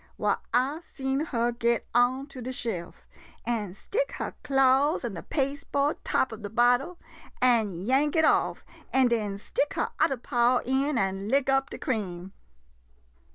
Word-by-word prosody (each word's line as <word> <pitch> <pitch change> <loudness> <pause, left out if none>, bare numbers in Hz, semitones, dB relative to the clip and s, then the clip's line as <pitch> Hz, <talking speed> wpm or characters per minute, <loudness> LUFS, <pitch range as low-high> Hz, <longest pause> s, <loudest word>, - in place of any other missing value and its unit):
Why, - - +1
I 260 +6 +1 0.2
seen 265 0 -1
her 240 -4 0
get 235 -1 0
onto 255 +3 +1
de 250 +2 -4
shelf, 215 -9 -5 0.4
an' 210 -6 -2
stick - - -2
her - - -4
claws 270 +1 +3
in 230 - -3
de 170 - -6
paste 280 -1 -3
board 285 +2 0
top 260 - 0
ob 220 - -9
de 205 - -5
bottle, 245 - +2 0.4
and 220 -8 +2
yank 275 +6 +2
it 320 -1 +4
off, - - +1 0.3
an' 260 -2 +4
den 210 -4 -1
stick 480 - -2
her - - -1
udder 270 - +2
paw 240 +1 +2
in 265 +2 +1
an' 195 -1 -1
lick 275 +1 +2
up 270 0 +2
de - - -7
cream. 190 -6 -4
250 Hz, 160 wpm, -27 LUFS, 225-275 Hz, 0.4 s, it